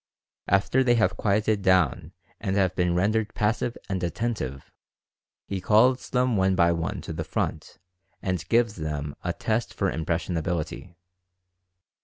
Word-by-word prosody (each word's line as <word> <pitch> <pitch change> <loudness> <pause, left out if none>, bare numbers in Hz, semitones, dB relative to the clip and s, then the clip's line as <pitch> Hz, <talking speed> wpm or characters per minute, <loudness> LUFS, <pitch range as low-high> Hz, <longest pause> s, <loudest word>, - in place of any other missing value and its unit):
After 100 +7 +3
they 120 -1 +4
have 95 -6 +2
quieted 105 +2 +1
down 95 -1 +2 0.3
and 95 - -2
have 95 -2 +2
been 90 -1 +1
rendered 105 +4 +1
passive 115 +3 0
and 95 -2 -2
attentive, 85 - -3 0.7
he 95 -2 -4
calls 125 +7 +3
them 125 -2 +1
one 95 -1 +2
by 85 -2 +4
one 85 +3 -2
to 80 - -6
the 80 0 -3
front - - -3 0.4
and 90 -2 -2
gives 115 -3 +2
them 75 -2 -4
a - - 0
test 110 +1 -2
for - - 0
impressionability. 85 +1 -3
95 Hz, 140 wpm, -26 LUFS, 85-110 Hz, 0.7 s, they